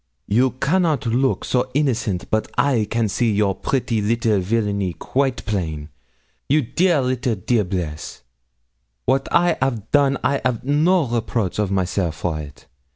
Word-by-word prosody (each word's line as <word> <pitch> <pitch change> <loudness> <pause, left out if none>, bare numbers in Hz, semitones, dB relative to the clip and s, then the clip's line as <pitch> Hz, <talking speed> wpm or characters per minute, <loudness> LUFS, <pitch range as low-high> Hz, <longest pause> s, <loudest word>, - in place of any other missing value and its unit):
You 125 +4 +2
cannot 150 +1 +1
look 125 +4 +1
so 125 0 0
innocent 115 -10 0
but 110 0 0
I 125 -7 +2
can 115 -1 +1
see 115 +3 +1
your 100 -1 +2
pretty 120 -1 -1
little 110 -1 +1
villany 100 -2 -1
quite 130 +2 -1
plain 80 -8 -3 0.6
you 150 +2 +3
dear 170 +5 +2
little 125 -2 0
diablesse. 90 -7 -2 0.8
'Wat 135 0 +1
I 175 -1 +3
'av 120 -6 -2
done 140 -2 +3
I 140 - +1
'av 125 -3 -1
no 155 +5 +3
reproach 115 -5 -2
of 105 -2 +1
myself 90 -3 -1
for 80 -1 -2
it. 70 -4 -10
115 Hz, 145 wpm, -21 LUFS, 100-135 Hz, 0.8 s, you